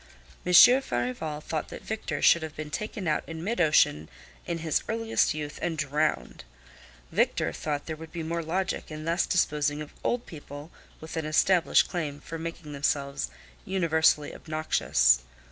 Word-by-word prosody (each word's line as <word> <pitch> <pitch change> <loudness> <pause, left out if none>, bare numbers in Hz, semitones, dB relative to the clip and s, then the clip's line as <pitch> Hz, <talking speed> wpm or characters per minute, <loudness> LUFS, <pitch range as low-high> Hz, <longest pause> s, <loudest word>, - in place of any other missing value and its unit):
Monsieur 245 +9 +8
Farival 125 - -3
thought 155 0 -3
that - - -9
Victor 215 -9 -4
should 170 - +6
have 160 -1 -6
been 150 -1 -6
taken 210 +1 -4
out 150 - +1
in 165 0 -6
mid 215 0 -1
ocean 115 - +3 0.4
in 170 - -2
his 160 -2 0
earliest 225 -6 +1
youth 150 0 -5
and 165 -2 -2
drowned. 150 - -1 0.7
Victor - - +1
thought 145 -2 -3
there 160 - -4
would 160 0 -11
be 170 -1 -5
more 170 +1 -2
logic 185 +4 -2
in 155 0 -7
thus 170 +2 +1
disposing 150 -4 +1
of 150 -1 -8
old 245 0 0
people 145 -1 -10 0.3
with 160 +1 -8
an 160 - -2
established 170 +3 +4
claim 150 -5 -4
for 165 +1 -7
making 165 -2 -6
themselves 140 0 -1 0.3
universally 160 -5 +2
obnoxious. 65 - +2
160 Hz, 160 wpm, -27 LUFS, 150-170 Hz, 0.7 s, Monsieur